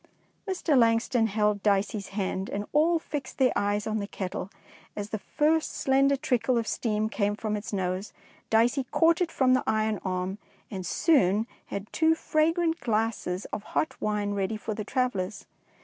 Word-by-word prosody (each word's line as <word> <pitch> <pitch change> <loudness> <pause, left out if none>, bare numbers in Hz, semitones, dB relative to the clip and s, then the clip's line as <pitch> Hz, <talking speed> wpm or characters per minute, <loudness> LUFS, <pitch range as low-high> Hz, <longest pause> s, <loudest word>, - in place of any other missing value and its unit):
Mr. 355 -5 +1
Langston 230 -1 +3
held 210 -1 +1
Dicey's 200 0 +1
hand, 195 -1 -3
and 205 +1 -3
all 325 +3 +4
fixed 295 -4 -6
their 260 -2 +4
eyes 205 +1 0
on 220 0 -1
the 200 - -4
kettle, 190 -1 -5 0.5
and 205 - -3
as 205 - -10
the 215 - -2
first 310 +7 +1
slender 275 +1 +3
trickle 255 -3 +1
of 230 - 0
steam 215 -1 -1
came 205 -2 0
from 215 0 -2
its 210 +1 -5
nose. 190 0 -2 0.4
Dicey 240 +4 +3
caught 330 +6 +3
it 345 - +1
from 255 -1 +3
the 255 - +2
iron 215 -1 +1
arm, 185 +1 -2 0.3
and 190 -3 -4
soon 215 - +3 0.2
had 200 0 -5
two 320 0 +3
fragrant 330 +2 +1
glasses 215 -5 -1
of - - -2
hot 310 +8 -2
wine 210 -1 0
ready 200 +2 -1
for 215 0 -4
the 215 0 -4
travellers. 215 -7 -2
220 Hz, 170 wpm, -27 LUFS, 205-270 Hz, 0.5 s, all